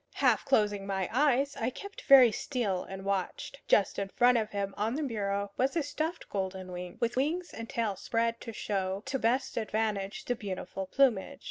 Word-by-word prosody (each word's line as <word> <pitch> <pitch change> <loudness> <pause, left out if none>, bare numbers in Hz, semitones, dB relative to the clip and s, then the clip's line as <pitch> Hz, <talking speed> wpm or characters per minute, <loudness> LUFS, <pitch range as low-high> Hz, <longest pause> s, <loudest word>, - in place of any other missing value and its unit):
Half - - +3
closing 205 -6 +2
my 190 -2 -1
eyes, 280 +1 +2
I 225 - -1
kept 400 +10 -9
very 260 -4 +8
still 215 -7 -1
and 195 0 -8
watched. 200 +7 -3
Just 200 - +3
in 200 -1 -2
front 245 +4 +4
of 220 -2 +1
him, 200 -1 -3
on 220 +4 -1
the 305 - -1
bureau, 200 -5 -2
was 265 +5 +1
a 330 - +1
stuffed 315 +4 -3
golden 190 -2 -4
wing, 180 0 -7
with 235 0 0
wings 325 +7 -1
and 230 0 -7
tail 225 -4 -1
spread 230 +4 -1
to 230 - -6
show 195 -2 -2
to 270 0 -2
best 245 +4 0
advantage 215 -3 -2
the 245 - +1
beautiful 195 -3 -5
plumage. 265 +2 +2
220 Hz, 190 wpm, -30 LUFS, 195-260 Hz, -, very